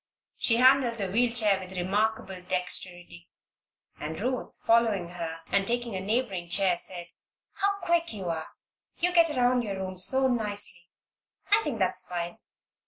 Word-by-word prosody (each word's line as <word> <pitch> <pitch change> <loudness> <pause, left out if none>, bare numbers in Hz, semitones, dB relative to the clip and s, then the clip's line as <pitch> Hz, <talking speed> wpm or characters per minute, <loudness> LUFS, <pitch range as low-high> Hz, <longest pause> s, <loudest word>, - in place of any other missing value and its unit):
She 230 - +2
handled 255 -1 +4
the 195 -5 -4
wheel 235 +3 +2
chair 210 -5 +3
with 185 0 -9
remarkable 195 0 -1
dexterity, 180 -1 -1 0.7
and 155 +1 -6
Ruth, 255 +4 -3
following 225 -6 +2
her 165 -2 -6
and 195 0 +1
taking 240 -2 -1
a 185 - -3
neighboring 195 -4 -2
chair 190 0 +2
said: 175 0 -7 0.5
"How 400 0 0
quick 340 -1 0
you 200 -4 -6
are! 165 -2 -3 0.5
You 355 +1 0
get 335 -2 +5
around 250 -3 +2
your 205 -4 -4
room 185 -1 -5
so 265 +8 +6
nicely. 205 -7 -1 0.6
I 425 +1 +5
think 275 -6 -3
that's 185 -2 0
fine." 175 -1 -5
200 Hz, 155 wpm, -27 LUFS, 180-245 Hz, 0.7 s, so